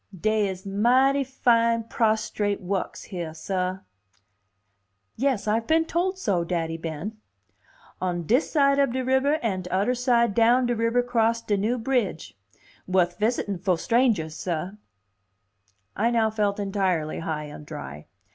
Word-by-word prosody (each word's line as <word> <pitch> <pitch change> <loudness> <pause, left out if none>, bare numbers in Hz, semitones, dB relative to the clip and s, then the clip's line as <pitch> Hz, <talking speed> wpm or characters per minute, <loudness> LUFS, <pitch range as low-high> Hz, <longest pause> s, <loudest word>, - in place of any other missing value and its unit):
"Dey 215 +1 +1
is 190 0 -6
mighty 255 +8 +3
fine 230 -3 +2
prostrate 215 -2 0
wukks 190 0 -3
heah, 170 -5 -6
sah." 185 +2 -2 1.3
"Yes, 260 -5 0
I've 225 +2 0
been 325 0 +3
told 360 +3 -1
so, 200 - 0
Daddy 165 -2 -2
Ben." 165 +6 -5 0.8
"On 175 -2 -1
dis 245 - +2
side 280 -2 +3
up 275 -4 +2
de 260 0 -2
ribber 265 +3 +2
an' 195 -5 -1
tudder 190 +6 0
side 240 -3 +2
down 235 +3 +4
de 240 0 0
ribber 230 +2 +1
'cross 230 -1 +1
de 205 - 0
new 215 +5 0
bridge. 225 - -2 0.5
Wuth 180 -1 +1
visitin' 210 -4 0
fo' 185 0 +1
strangers, 225 -6 +1
sah." 175 +1 -3 1.2
I 225 +3 +2
now 225 -2 +2
felt 210 -2 0
entirely 190 -6 -1
high 160 -2 -3
and 150 0 -9
dry. 75 - -8
215 Hz, 140 wpm, -25 LUFS, 180-245 Hz, 1.3 s, down